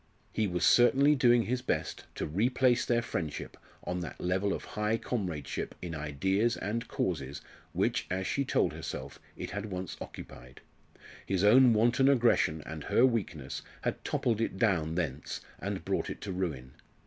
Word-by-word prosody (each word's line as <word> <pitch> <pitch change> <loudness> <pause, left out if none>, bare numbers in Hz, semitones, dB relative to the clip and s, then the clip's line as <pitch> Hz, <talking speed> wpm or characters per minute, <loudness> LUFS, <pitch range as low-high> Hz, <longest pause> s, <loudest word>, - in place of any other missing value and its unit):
He 110 -1 +1
was 90 -1 0
certainly 135 +4 +6
doing 120 -4 +4
his 125 +2 -1
best - - -2
to - - -2
replace 120 - +2
their 120 -1 +2
friendship 80 -9 -4 0.3
on 90 0 -2
that 90 - -6
level 95 +3 0
of - - -3
high 105 +1 -1
comradeship 90 - -3
in 85 -2 -5
ideas 95 +10 0
and 115 +4 -3
causes 70 -6 -2 0.3
which, - - 0
as 95 +1 -1
she 140 - 0
told - - +1
herself, 70 +2 -6 0.2
it - - -5
had 105 +1 -4
once 95 -2 -5
occupied. 60 +1 -10 0.7
His 95 0 +1
own 120 +4 +7
wanton 120 +5 +4
aggression 115 - +3
and 80 -2 -7
her 120 - +4
weakness 90 - -2 0.2
had - - -2
toppled 115 -2 0
it 115 - -1
down 85 -7 +1
thence, 75 -6 -3 0.2
and - - -4
brought - - -1
it - - -6
to 100 - -4
ruin. 80 -9 -3
95 Hz, 160 wpm, -30 LUFS, 80-120 Hz, 0.7 s, own